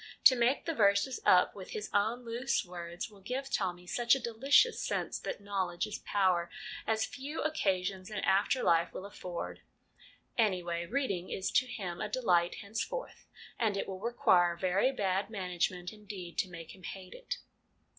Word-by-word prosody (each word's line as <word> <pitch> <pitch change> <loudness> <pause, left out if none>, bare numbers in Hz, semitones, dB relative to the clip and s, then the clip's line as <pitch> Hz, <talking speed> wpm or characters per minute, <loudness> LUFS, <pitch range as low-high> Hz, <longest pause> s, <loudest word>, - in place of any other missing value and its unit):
To 260 - +9
make 245 +3 +2
the 330 - 0
verses 200 +1 +3
up 180 0 +6
with 190 -2 -9
his 210 - -3
own 220 +4 +1
loose 235 +2 0
words 175 +3 -6
will 200 -2 -16
give 260 +6 -4
Tommy 180 -2 -1
such 240 +7 +3
a - - -2
delicious 270 - +3
sense - - -2
that - - -5
knowledge 190 -3 -1
is 215 - -5
power, 185 -4 +2 0.4
as 220 0 +2
few 285 +3 -5
occasions 190 -10 0
in 210 - -5
after 205 +7 +2
life 170 -1 +3
will 190 - -6
afford. 180 -3 -6 0.8
Anyway, 175 -5 +1
reading 200 -8 -1
is 190 - -2
to 255 - +3
him 185 -8 -5
a 215 - -2
delight 180 -8 +2
henceforth, 225 - -5 0.3
and 215 -4 +1
it - - -2
will 190 -1 -5
require 185 -6 +3
very 190 +8 +2
bad 195 -4 0
management 180 -2 -2
indeed 200 -5 -8
to 185 - +1
make 165 -2 -9
him 190 - -15
hate 185 +1 -8
it. - - -5
200 Hz, 165 wpm, -32 LUFS, 180-235 Hz, 0.8 s, To